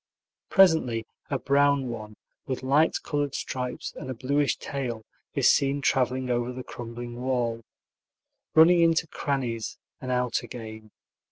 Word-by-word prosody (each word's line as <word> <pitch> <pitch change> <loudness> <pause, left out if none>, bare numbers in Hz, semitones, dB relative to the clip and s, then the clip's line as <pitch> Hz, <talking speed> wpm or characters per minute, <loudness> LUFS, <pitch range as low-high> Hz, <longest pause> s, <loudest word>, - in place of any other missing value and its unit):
Presently 160 - +4 0.2
a 140 - 0
brown 140 0 +2
one, 110 -2 -7 0.3
with 130 -1 -3
light 145 +5 +3
colored 145 -2 -1
stripes 125 -1 -4
and 140 -6 -7
a 130 - -3
bluish 140 +4 +1
tail, 120 -5 -4 0.3
is - - +5
seen 140 0 +2
traveling 130 -2 +1
over 120 0 0
the 125 0 -7
crumbling 120 0 -7
wall, 120 -3 -1 0.9
running 170 +2 +7
into 165 -1 +3
crannies 130 -7 -3 0.2
and 130 - -4
out 125 -1 +1
again. 110 -2 -9
130 Hz, 135 wpm, -27 LUFS, 120-140 Hz, 0.9 s, running